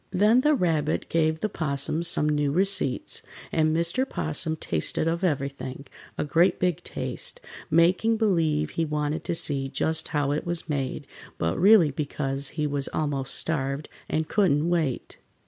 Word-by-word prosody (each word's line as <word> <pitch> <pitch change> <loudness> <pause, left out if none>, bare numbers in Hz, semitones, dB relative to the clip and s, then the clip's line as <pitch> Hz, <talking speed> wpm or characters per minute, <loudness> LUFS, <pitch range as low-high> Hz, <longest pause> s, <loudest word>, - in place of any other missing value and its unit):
Then 210 +6 +4
the 300 +2 +3
Rabbit 160 - 0
gave 160 -1 +1
the - - +1
'Possum 155 -3 -2
some 170 -3 +1
new 145 -1 +1
receipts, 185 -5 0 0.3
and 155 0 +2
Mr. 170 +10 0
'Possum 160 +1 0
tasted 85 - 0
of 170 +3 -1
everything, 140 -4 -2 0.3
a - - 0
great 170 +5 +2
big 180 -3 0
taste, - - -5 0.3
making 180 +8 +3
believe 160 -8 +1
he 165 - -1
wanted 150 +1 -2
to - - -1
see 135 -4 -1
just 160 +3 0
how 145 -2 0
it 150 - -1
was 175 -1 -2
made, 140 -4 -3 0.3
but 80 0 -1
really 190 -5 +6
because 135 -1 -2
he 150 - 0
was 145 -1 +1
almost 140 -3 -2
starved, 140 -2 -2 0.2
and 155 0 -1
couldn't 170 -6 +2
wait. 160 -7 -1
155 Hz, 155 wpm, -26 LUFS, 145-175 Hz, 0.3 s, really